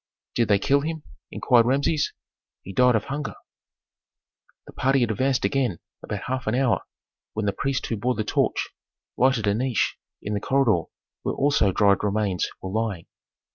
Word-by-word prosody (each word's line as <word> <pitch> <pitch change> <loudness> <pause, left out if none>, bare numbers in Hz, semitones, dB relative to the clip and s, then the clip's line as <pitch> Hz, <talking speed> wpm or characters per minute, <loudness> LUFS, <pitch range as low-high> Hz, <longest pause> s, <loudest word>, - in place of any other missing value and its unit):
"Did 115 -2 +1
they 100 - +4
kill 140 +8 +2
him?" 160 0 -4 0.3
inquired 120 -2 +3
Rameses. 140 +3 +1 0.5
"He 95 - -8
died 125 +2 +4
of 110 - +1
hunger." 145 +1 -4 1.3
The - - -13
party 135 +1 +2
had 120 -2 +2
advanced 130 +4 +1
again 130 -10 0 0.2
about 100 - -5
half 130 -1 -3
an 110 - +1
hour, 130 -2 +2 0.5
when 110 -1 -2
the 100 - +1
priest 135 -1 -2
who 115 - -2
bore 125 +4 0
the 110 - -1
torch - - 0 0.5
lighted 130 -4 +2
a 100 - +3
niche 125 +2 0 0.2
in 105 - -4
the 100 - 0
corridor 115 - +2 0.4
where - - -2
also 140 -8 +3
dried 100 0 +3
remains 100 -4 0
were 95 - -4
lying. 105 -5 -2
120 Hz, 170 wpm, -24 LUFS, 105-135 Hz, 1.3 s, they